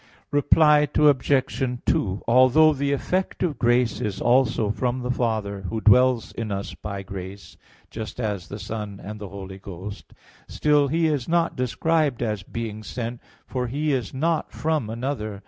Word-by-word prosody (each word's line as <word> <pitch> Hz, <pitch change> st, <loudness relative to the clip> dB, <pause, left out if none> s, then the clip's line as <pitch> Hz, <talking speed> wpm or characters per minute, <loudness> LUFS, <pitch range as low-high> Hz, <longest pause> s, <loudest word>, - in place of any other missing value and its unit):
Reply 150 Hz, +1 st, +5 dB
Obj. 135 Hz, -3 st, +2 dB
2: 95 Hz, 0 st, 0 dB
Although 130 Hz, +6 st, +6 dB
the 140 Hz, 0 st, -1 dB
effect 185 Hz, +8 st, -1 dB
of 155 Hz, -8 st, -1 dB
grace 120 Hz, -1 st, +2 dB
is 100 Hz, -2 st, -3 dB
also 120 Hz, -4 st, +2 dB
from 125 Hz, +2 st, -1 dB
the 125 Hz, -, -1 dB
Father, 110 Hz, -5 st, -1 dB
Who 110 Hz, -, -2 dB
dwells 125 Hz, +2 st, +4 dB
in 110 Hz, -2 st, -5 dB
us 100 Hz, 0 st, -4 dB
by 100 Hz, -1 st, -6 dB
grace, 95 Hz, 0 st, -8 dB, 0.4 s
just 110 Hz, +2 st, -7 dB
as 105 Hz, -7 st, -3 dB
the 100 Hz, -, -7 dB
Son 105 Hz, -1 st, -6 dB
and 105 Hz, +1 st, -8 dB
the 100 Hz, -, -6 dB
Holy 95 Hz, -1 st, -8 dB
Ghost, 100 Hz, +2 st, -9 dB, 0.3 s
still 150 Hz, -1 st, +2 dB
He 165 Hz, +4 st, +1 dB
is 150 Hz, -5 st, 0 dB
not 170 Hz, 0 st, +1 dB
described 140 Hz, +1 st, 0 dB
as 105 Hz, -3 st, -2 dB
being 110 Hz, +1 st, -6 dB
sent, 115 Hz, +2 st, -5 dB, 0.2 s
for 125 Hz, -1 st, -3 dB
He 145 Hz, +4 st, -1 dB
is 125 Hz, -7 st, -2 dB
not 160 Hz, +4 st, -1 dB
from 155 Hz, -8 st, -1 dB
another. 115 Hz, -3 st, -4 dB
120 Hz, 160 wpm, -24 LUFS, 105-140 Hz, 0.4 s, Although